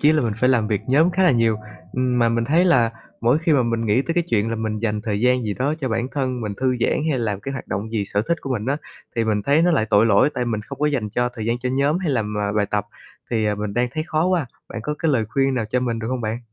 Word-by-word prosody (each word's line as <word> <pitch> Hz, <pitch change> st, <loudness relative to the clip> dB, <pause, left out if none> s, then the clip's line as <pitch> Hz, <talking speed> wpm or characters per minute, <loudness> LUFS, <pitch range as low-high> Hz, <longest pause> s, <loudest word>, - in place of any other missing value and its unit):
chí 150 Hz, +1 st, +5 dB
là 155 Hz, -2 st, +2 dB
mình 115 Hz, -3 st, 0 dB
phải 125 Hz, -, +4 dB
làm 115 Hz, -5 st, +2 dB
việc 105 Hz, -3 st, 0 dB
nhóm 150 Hz, +7 st, +4 dB
khá 190 Hz, +2 st, +1 dB
là 180 Hz, -, +6 dB
nhiều. 115 Hz, -2 st, +2 dB, 0.4 s
Ừm, 125 Hz, -1 st, 0 dB
mà 115 Hz, -1 st, +4 dB
mình 115 Hz, 0 st, 0 dB
thấy 160 Hz, +8 st, +3 dB
là 120 Hz, -11 st, +4 dB, 0.3 s
mỗi 120 Hz, +5 st, +3 dB
khi 160 Hz, 0 st, +1 dB
mà 140 Hz, -4 st, +4 dB
mình 115 Hz, -1 st, -1 dB
nghĩ 110 Hz, +5 st, +3 dB
tới 165 Hz, -, -3 dB
cái 175 Hz, -, +2 dB
chuyện 110 Hz, 0 st, +1 dB
là 115 Hz, -, -2 dB
mình 110 Hz, -1 st, -2 dB
dành 105 Hz, -1 st, -1 dB
thời 105 Hz, -2 st, -1 dB
gian 125 Hz, 0 st, +2 dB
gì 105 Hz, -2 st, -2 dB
đó 140 Hz, +6 st, 0 dB
cho 135 Hz, -, -1 dB
bản 115 Hz, +1 st, -1 dB
thân 130 Hz, -3 st, -2 dB
mình 105 Hz, -3 st, -3 dB
thư 130 Hz, -1 st, +1 dB
giãn -, -, +2 dB, 0.2 s
hay 135 Hz, -, 0 dB
làm 105 Hz, -4 st, -2 dB
cái 135 Hz, -, -5 dB
hoạt 130 Hz, -, -6 dB
động 105 Hz, +4 st, -3 dB
gì 105 Hz, -3 st, 0 dB
sở 100 Hz, +1 st, 0 dB
thích 170 Hz, -, +1 dB
của 135 Hz, -, -6 dB
mình 110 Hz, -3 st, -3 dB
á, 140 Hz, +2 st, +1 dB, 0.4 s
thì 115 Hz, -, +2 dB
mình 105 Hz, -2 st, 0 dB
thấy 145 Hz, +8 st, +3 dB
nó 175 Hz, -, +4 dB
lại 110 Hz, -10 st, +2 dB
tội 105 Hz, +1 st, +5 dB
lỗi 110 Hz, +6 st, +4 dB
tại 125 Hz, -, -1 dB
mình 110 Hz, -3 st, -2 dB
không 140 Hz, +5 st, -9 dB
có 150 Hz, -, +2 dB
dành 130 Hz, -8 st, -1 dB
cho 125 Hz, +3 st, 0 dB
thời 110 Hz, -3 st, -5 dB
gian 115 Hz, +1 st, 0 dB
cho 125 Hz, +1 st, -2 dB
nhóm 140 Hz, +5 st, +2 dB
hay 180 Hz, -5 st, -1 dB
làm, 105 Hz, -5 st, -1 dB
à, 100 Hz, -1 st, -1 dB
bài 105 Hz, -1 st, +1 dB
tập. 105 Hz, -1 st, 0 dB, 0.4 s
Thì, 110 Hz, -2 st, +1 dB
à, 105 Hz, -, +1 dB
mình 105 Hz, 0 st, -4 dB
đang 125 Hz, +1 st, +1 dB
thấy 155 Hz, -, -1 dB
khó 155 Hz, 0 st, +1 dB
quá, 180 Hz, -6 st, +1 dB, 0.2 s
bạn 115 Hz, -, -6 dB
có 150 Hz, +5 st, -2 dB
cái 160 Hz, -2 st, +1 dB
lời 115 Hz, -4 st, +2 dB
khuyên 135 Hz, +2 st, +1 dB
nào 120 Hz, -3 st, -1 dB
cho 125 Hz, -, +1 dB
mình 120 Hz, -2 st, -1 dB
được 110 Hz, 0 st, -4 dB
hông 130 Hz, -1 st, -2 dB
bạn? 110 Hz, 0 st, -2 dB
120 Hz, 315 wpm, -22 LUFS, 110-140 Hz, 0.4 s, là